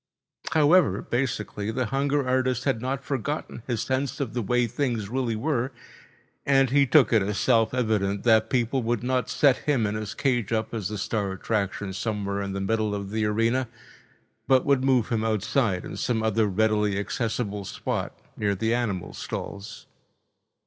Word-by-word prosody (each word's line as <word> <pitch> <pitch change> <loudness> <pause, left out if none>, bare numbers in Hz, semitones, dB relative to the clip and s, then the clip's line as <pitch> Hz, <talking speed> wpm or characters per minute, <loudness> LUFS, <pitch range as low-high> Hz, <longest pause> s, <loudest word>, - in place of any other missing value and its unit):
However, 150 - +4
basically 110 -4 -2
the 125 +3 -1
hunger 140 +2 0
artist 130 -1 +1
had 135 -5 0
not 135 +2 -2
forgotten 140 -1 -3
his 120 -3 -1
sense 130 +1 -2
of 135 -6 -3
the 120 - -1
way 125 +3 +1
things 115 -4 -2
really 125 -2 -1
were, 130 +1 -1 0.7
and 135 -2 +3
he 140 0 +4
took 140 -2 +5
it 110 - +5
as 100 +1 -2
self 115 -3 +3
evident 105 -5 0
that 110 -2 +4
people 125 +1 +1
would 120 -1 -1
not 130 0 0
set 140 -3 +4
him 135 -7 0
and 105 0 -1
his 105 -1 -5
cage 120 -6 0
up 110 0 -1
as 105 -5 -2
the 105 - -4
star 100 0 -2
attraction 100 -1 -2
somewhere 100 -1 -2
in 100 -1 -4
the 100 - -3
middle 110 +1 0
of 100 -1 -5
the 110 0 0
arena, 115 +4 +1 0.8
but 130 -1 +4
would 140 -2 +3
move 130 -4 +2
him 115 -2 0
outside 110 -2 0
in - - -7
some 115 -3 0
other 110 0 +2
readily 105 0 +1
accessible 105 0 -2
spot - - -3 0.2
near 100 -1 0
the 110 +4 0
animal 105 -7 -2
stalls. 100 +3 -7
115 Hz, 170 wpm, -26 LUFS, 105-130 Hz, 0.8 s, took